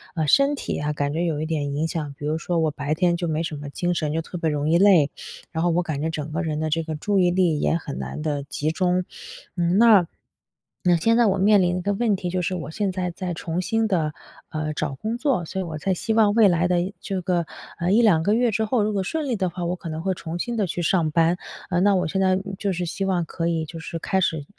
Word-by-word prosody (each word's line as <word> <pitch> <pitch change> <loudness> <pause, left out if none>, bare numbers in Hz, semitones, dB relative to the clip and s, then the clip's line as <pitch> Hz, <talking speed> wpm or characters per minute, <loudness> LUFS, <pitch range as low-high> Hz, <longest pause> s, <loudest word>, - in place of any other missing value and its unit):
呃， 160 -3 0
身 275 - +4
体 - - -4
啊 150 0 -1
感 145 -1 -1
觉 170 +3 0
有 155 -3 -1
一 - - -1
点 145 -3 -2
影 155 +3 0
响， 155 -3 -4
比 145 - -7
如 155 +2 0
说 170 +1 -1
我 160 -1 +2
白 145 +1 -2
天 175 +1 +2
就 175 0 -2
没 160 0 -1
什 160 -2 -3
么 145 -1 -7
精 175 +4 -1
神， 150 -3 -1
就 165 - 0
特 175 - -7
别 165 -2 0
容 150 0 -1
易 165 - +4
累， 180 -6 +5 0.4
然 160 -1 -2
后 175 - +3
我 170 +2 +2
感 155 -4 -3
觉 160 - 0
整 155 -1 -5
个 160 +4 -1
人 155 -3 -2
的 155 0 -1 0.3
注 205 +4 0
意 180 -1 +4
力 175 -4 +2
也 - - +1
很 155 -4 -5
难 - - -5
的 145 -2 -2
集 145 +2 -2
中。 180 +2 +1 0.5
嗯， 175 +1 +1
那 215 -7 +6 0.8
那 180 -2 +4
现 225 +8 +2
在 240 - +5
我 195 -2 +2
面 200 +1 +5
临 175 -1 +2
的 - - -1
一 - - -4
个 200 +3 0
问 215 0 +1
题 180 -1 -4
就 180 +1 -1
是 180 +2 -1
我 160 -3 -5
现 200 +2 -1
在 180 -1 -2
在 180 +1 -4
重 165 +1 -3
新 225 +4 0
的， 160 -6 0 0.4
呃， 155 0 -3
找 150 -2 -3
工 220 - -3
作， 255 - +1
所 190 - -5
以 190 - -1
我 160 -2 -5
在 190 +5 0
希 220 +5 -2
望 215 -2 +4
未 220 -1 +6
来 175 -2 +2
的 180 -1 +2 0.2
这 195 -2 -3
个， 175 -1 0 0.3
呃， 175 +2 0
1-2 210 -7 +4
个 205 - +2
月 240 +1 +2
之 220 +1 0
后， 220 0 +1
如 210 +1 0
果 195 -2 0
顺 305 +8 -2
利 245 - 0
的 190 -3 0
话， 175 0 -5
我 175 +1 -1
可 175 -2 -8
能 160 0 -4
会 190 +2 0
重 170 0 -6
新 240 +5 -2
的 215 -3 +1
去 175 - -3
上 165 -2 +1
班。 165 +2 +3 0.3
呃， 175 -1 +1
那 200 +1 +4
我 180 - +1
现 190 +4 -1
在 185 0 +3 0.2
就 200 0 -1
是 180 0 -2
希 175 +3 -3
望 180 -3 0
可 165 +1 -3
以 165 -2 0
就 165 +2 -9
是 165 +1 -6
开 190 +3 0
始， 160 -5 0
175 Hz, 295 characters per minute, -23 LUFS, 160-195 Hz, 0.8 s, 那